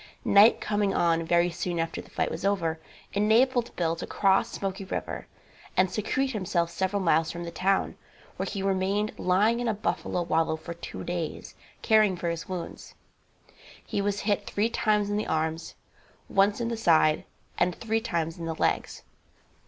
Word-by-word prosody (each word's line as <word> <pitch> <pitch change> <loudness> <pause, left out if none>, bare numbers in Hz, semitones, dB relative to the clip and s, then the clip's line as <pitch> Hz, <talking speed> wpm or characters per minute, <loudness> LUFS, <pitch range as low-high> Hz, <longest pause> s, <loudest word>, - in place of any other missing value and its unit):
Night 205 +3 +6
coming 205 -2 0
on 165 -1 +2
very 170 +1 +2
soon 175 0 -3
after 165 0 -2
the - - -17
fight - - -1
was 160 - -5
over, 170 -5 0 0.3
enabled 235 +4 +2
Bill 165 -1 0
to - - -6
cross 195 +3 +2
Smoky 195 -2 -4
river 190 - -5 0.5
and 185 0 +3
secrete 260 +5 -1
himself 175 -6 -1
several 190 +2 -1
miles 165 -1 +3
from 170 +1 -5
the 170 - -6
town, 190 +4 0 0.4
where - - -3
he 195 -2 -4
remained 195 +2 0
lying 205 +6 +2
in 245 - -1
a 220 - +1
buffalo 180 -3 -2
wallow 160 -1 +1
for 170 +2 -7
two 170 - -8
days, 175 -2 -4 0.3
caring 215 -4 +4
for 170 0 -1
his 170 +3 -6
wounds. 180 -2 -7 0.9
He 200 - -2
was 200 0 -1
hit 205 -1 0
three 210 +3 0
times 210 -2 +1
in 205 - 0
the 210 - -2
arms, 160 +1 -2 0.5
once 200 +2 +2
in 235 -1 -1
the 230 - -3
side 160 -7 +3 0.4
and 175 0 +2
three 225 0 -1
times 165 -6 -2
in 165 - -4
the 165 -1 -3
legs. - - -1
190 Hz, 175 wpm, -27 LUFS, 170-210 Hz, 0.9 s, Night